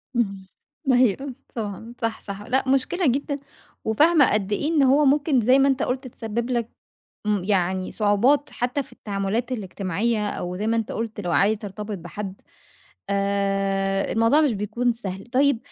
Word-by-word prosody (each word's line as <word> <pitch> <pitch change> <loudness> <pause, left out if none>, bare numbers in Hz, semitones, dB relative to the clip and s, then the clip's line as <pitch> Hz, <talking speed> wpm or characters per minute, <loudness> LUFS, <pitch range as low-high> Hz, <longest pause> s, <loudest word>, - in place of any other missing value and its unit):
اهم، 195 -5 -1 0.4
أيوه، 255 +2 +2 0.2
طبعًا، 220 +1 -5
صح، 230 -1 -2
صح، 200 0 -7
لأ 260 +5 0
مشكلة 290 +6 +2
جدًا، 280 +2 0 0.5
وفاهمة 290 +5 +4
قد 205 -1 0
إيه 210 +8 0
إن 315 -3 +3
هو 275 +3 +5
ممكن 280 -1 +3
زي 255 +5 +5
ما 275 - +5
أنت 270 -2 +1
قُلت 255 +1 -2
تسبب 235 0 -4
لك 235 -2 -1 0.6
إمم، 210 -3 +1
يعني 185 -1 0
صعوبات 225 +8 +2
حتّى 250 +3 -1
في 255 -2 -18
التعاملات 210 +3 -2
الاجتماعية 210 0 -1
أو 180 -2 -4
زي 210 +4 -2
ما 230 +1 +2
أنت 225 - -2
قُلت 225 -1 -4
لو 175 -4 -2
عايز 210 +5 +3
ترتبط 205 0 -6
بحد، 195 +2 -7 0.7
آآ 195 -1 0
الموضوع 230 +7 +4
مش 295 -5 +3
بيكون 230 +4 0
سهل، 195 -4 -6
طيب 265 +1 +2
225 Hz, 160 wpm, -24 LUFS, 200-255 Hz, 0.7 s, هو